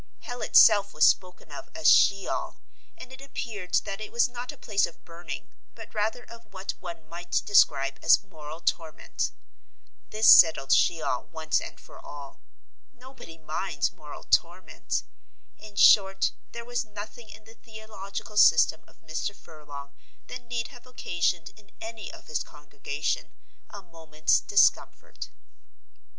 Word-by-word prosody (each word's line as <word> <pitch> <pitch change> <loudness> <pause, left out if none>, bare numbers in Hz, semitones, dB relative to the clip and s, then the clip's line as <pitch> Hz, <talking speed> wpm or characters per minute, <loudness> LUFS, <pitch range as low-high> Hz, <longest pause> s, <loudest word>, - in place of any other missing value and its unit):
Hell 245 0 -7
itself 205 -5 +5
was 155 - +5
spoken 180 -4 0
of 140 - -9
as 160 - 0
She 195 -1 +5
ol, - - -4 0.4
and 255 - -11
it 260 - -12
appeared 225 -9 -5
that 195 +2 -6
it 215 - -7
was 235 - +2
not 245 +2 -7
a 290 - -15
place 205 -5 0
of 170 - -17
burning, 170 -3 -9 0.2
but 225 -1 -12
rather 220 +3 -2
of 230 -3 -15
what 190 0 -5
one 170 -3 -9
might 175 +2 -3
describe 140 -10 +3
as 165 - +5
moral 160 -4 -11
torment. 160 -3 -2 0.8
This 215 +1 +1
settled 160 -5 +7
She 165 -2 +3
ol 125 - -2
once 160 -1 -2
and - - -10
for - - -15
all: 140 -2 -11 0.5
nobody 255 -10 -14
minds 155 0 -3
moral 150 -1 -11
torment. 175 +2 -1 0.6
In 215 -1 -13
short, 195 -2 +5 0.2
there 235 0 -8
was 245 +1 -2
nothing 215 +1 -10
in 215 - -13
the 225 +1 -16
theological 220 -2 -9
system 160 -5 +5
of - - -25
Mr. 160 +5 -4
Furlong 145 -4 -12 0.3
that 250 - -8
need 235 -1 -3
have 245 -1 -16
occasioned 175 -8 -2
in 215 -2 -21
any 225 -1 -8
of - - -14
his 155 -2 -3
congregation 145 0 -5 0.4
a 200 -1 -11
moment's 160 -3 0
discomfort. 205 - +1
195 Hz, 150 wpm, -26 LUFS, 160-220 Hz, 0.8 s, settled